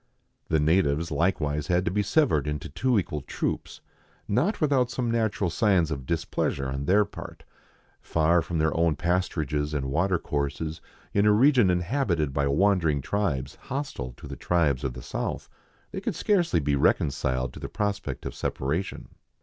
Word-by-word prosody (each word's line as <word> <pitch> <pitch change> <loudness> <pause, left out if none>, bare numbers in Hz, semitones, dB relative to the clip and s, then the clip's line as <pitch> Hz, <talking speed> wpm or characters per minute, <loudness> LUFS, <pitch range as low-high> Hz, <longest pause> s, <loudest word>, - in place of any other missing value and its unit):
The 80 - +2
natives 80 0 +2
likewise 75 -2 0
had 90 +1 +2
to - - 0
be 105 +2 +1
severed 100 - +2
into 75 -1 -3
two 120 - +1
equal 75 -6 -1
troops, - - -4 0.5
not 145 - +1
without 140 -5 +2
some 120 -1 -2
natural 110 -5 0
signs 90 -4 +2
of 70 -4 -5
dis 85 -1 -1
pleasure 70 -1 -1
on 70 +1 -3
their 100 +5 +4
part; - - -10 0.6
far 85 +2 +2
from 85 0 -3
their 80 0 +1
own 85 -2 +2
pasturages 75 -3 -1
and 65 -2 -2
water 90 +5 +2
courses, 75 +2 -3 0.3
in 100 +1 +3
a - - +6
region 125 -1 +5
inhabited 90 - 0
by 70 0 +1
wandering 80 -1 +2
tribes 75 -4 -1
hostile 130 - -4
to - - -10
the - - -6
tribes 75 -6 +1
of 65 -3 -2
the - - -9
south, - - -4 0.4
they - - -5
could - - -2
scarcely 175 - +2
be 70 -1 +1
reconciled 65 -3 +1
to - - -9
the - - -6
prospect 105 -2 -3
of - - -4
separation. 80 +9 -3
85 Hz, 165 wpm, -26 LUFS, 75-100 Hz, 0.6 s, a